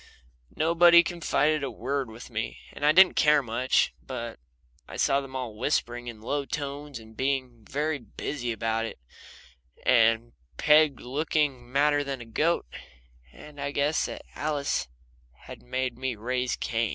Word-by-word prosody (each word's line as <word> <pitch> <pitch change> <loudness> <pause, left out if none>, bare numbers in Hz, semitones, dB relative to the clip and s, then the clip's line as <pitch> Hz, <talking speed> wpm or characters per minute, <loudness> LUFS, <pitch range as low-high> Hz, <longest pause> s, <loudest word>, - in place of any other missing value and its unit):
Nobody 170 +1 +6
confided 155 -3 +1
a 135 - -1
word 130 +3 -3
to - - -12
me, - - -3 0.2
and - - -9
I 150 - +6
didn't 185 +3 +7
care 150 -2 +4
much, 125 +2 +1
but 120 -3 -6 0.5
I - - -8
saw 140 +1 +2
them 135 -1 -10
all 125 -5 -4
whispering 120 0 -1
in 115 -3 -8
low 140 +5 -1
tones 145 0 -5
and 110 -1 -13
being 130 -3 -2
very 150 +1 -1
busy 120 +2 -4
about 115 0 -1
it, - - -7 0.9
and 115 +1 +4 0.3
Peg 150 -2 +4
looking 140 -2 -1
madder 145 +1 +3
than 135 -2 -4
a 120 - -9
goat, 155 +9 +1 0.7
and 145 - -12
I - - -1
guessed 145 +2 +1
that - - -7
Alice 145 - -1 0.5
had - - -11
made 125 -1 -3
me 130 -2 -2
raise 125 +3 -1
Cain. 115 -1 -1
135 Hz, 150 wpm, -27 LUFS, 120-150 Hz, 0.9 s, didn't